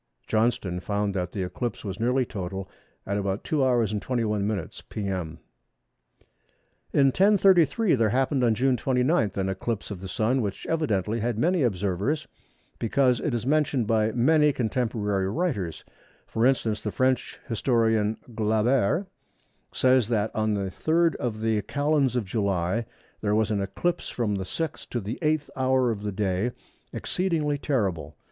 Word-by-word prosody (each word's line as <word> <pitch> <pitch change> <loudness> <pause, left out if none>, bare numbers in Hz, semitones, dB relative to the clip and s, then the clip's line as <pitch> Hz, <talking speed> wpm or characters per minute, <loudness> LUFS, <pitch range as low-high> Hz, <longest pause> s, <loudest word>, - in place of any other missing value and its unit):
Johnston 110 -5 0
found 100 +1 -1
that 90 -2 -2
the 95 - -3
eclipse 120 +5 -4
was 100 +1 -5
nearly 125 +3 +2
total 95 -2 -5 0.4
at 100 +1 -1
about 100 0 -2
2h. 125 -7 +1
21m. 105 -5 -2
p.m. 95 -6 -3 1.5
In 140 - +4
1033 190 - +4
there 115 -5 +3
happened 130 +3 +1
on 115 -2 +3
June 130 +2 +2
29 125 - +1
an 95 -1 -1
eclipse 100 +3 -3
of 95 -3 -6
the 95 - -6
Sun, 115 +7 +1
which 100 -3 -4
evidently 115 - 0
had 115 0 -1
many 175 +7 +2
observers, 100 - 0 0.5
because 125 +1 +2
it 145 -6 -1
is 120 - -3
mentioned 145 -4 +2
by 110 0 +2
many 150 +4 +4
contemporary 110 -6 -1
writers. 105 - -2 0.4
For 115 +2 +1
instance, 115 -5 0
the 105 - -3
French 130 +2 0
historian, 110 -3 +1 0.2
Glaber, 110 - +2 0.7
says 130 -3 +3
that 110 -2 0
"on 110 -1 +1
the 100 -2 -2
3rd 165 - +2
of 115 -5 -3
the 110 -1 +1
Calends 140 +3 +1
of 120 -4 0
July 100 +1 -1 0.3
there 105 -1 +1
was 110 0 +1
an 100 -2 0
eclipse 135 - -2
from 115 -4 -1
the 95 -1 -2
sixth 160 - -4
to 120 - -2
the 110 +4 -5
eighth 155 -2 0
hour 130 -2 +2
of 105 -3 -4
the 105 0 -3
day 100 +3 -1 0.4
exceedingly 160 -6 -1
terrible. 95 - -1
115 Hz, 150 wpm, -26 LUFS, 100-130 Hz, 1.5 s, In